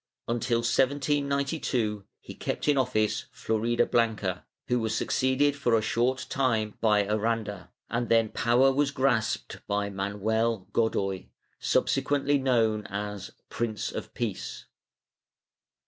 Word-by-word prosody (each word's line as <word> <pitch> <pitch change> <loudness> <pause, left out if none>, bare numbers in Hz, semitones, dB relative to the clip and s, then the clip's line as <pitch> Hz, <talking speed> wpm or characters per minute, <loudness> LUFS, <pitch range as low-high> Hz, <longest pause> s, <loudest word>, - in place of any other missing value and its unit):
Until 120 0 0
1792 140 -4 0 0.2
he - - -9
kept - - -4
in 145 - +5
office 125 -5 +1
Floridablanca, 110 -4 0 0.2
who 125 0 +2
was 110 -1 -1
succeeded 130 +5 +2
for 120 -5 +2
a - - +1
short 130 +4 0
time 115 -6 0
by 105 -2 +3
Aranda, 105 -2 -2 0.2
and 120 0 -2
then 115 -1 +4
power 125 +5 +3
was 140 +1 +2
grasped 130 -5 0
by 100 0 -1
Manuel 105 +2 -1
Godoy, 100 -4 0 0.3
subsequently 140 +1 +1
known 115 -5 +1
as 105 0 -5 0.2
Prince 115 -3 -2
of - - -6
Peace. - - -4
115 Hz, 115 wpm, -28 LUFS, 105-130 Hz, 0.3 s, in